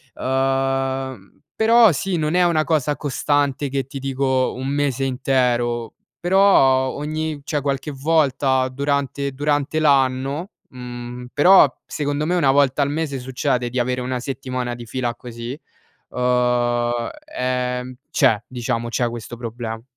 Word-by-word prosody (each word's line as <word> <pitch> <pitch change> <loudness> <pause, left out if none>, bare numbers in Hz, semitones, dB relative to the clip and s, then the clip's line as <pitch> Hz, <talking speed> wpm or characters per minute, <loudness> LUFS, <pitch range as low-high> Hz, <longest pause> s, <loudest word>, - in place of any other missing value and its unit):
Ehm, 135 0 -1
però 225 -2 +6
sì, 180 +3 -1
non 155 +1 -1
è 180 0 +4
una 165 -3 +2
cosa 150 -2 0
costante 145 -1 0
che 135 -1 -2
ti 135 0 -7
dico 130 -1 0
un 130 +1 -5
mese 140 -2 0
intero, 125 -3 0 0.3
però 170 -9 +4
ogni 155 +1 -4
cioè 150 0 -2
qualche 140 +1 -2
volta 135 -3 +1
durante 140 0 -1
durante 145 +2 0
l'anno, 140 +4 +1 0.2
mhmm, 125 0 -8
però 150 -2 +7
secondo 145 0 -2
me 175 - 0
una 145 -6 +3
volta 140 0 +3
al 140 - +2
mese 145 -3 -2
succede 125 -1 -1
di 125 - -5
avere 125 +1 0
una 125 0 -2
settimana 130 -2 -4
di 120 -1 -9
fila 120 0 -2
così, 120 +3 -7 0.5
uhm, 120 -1 +1 0.3
ehm, 125 0 -2
c'è, 110 0 +3
diciamo, 120 -2 -3
c'è 120 0 0
questo 120 0 -7
proble 115 -1 -5
135 Hz, 135 wpm, -21 LUFS, 125-145 Hz, 0.5 s, però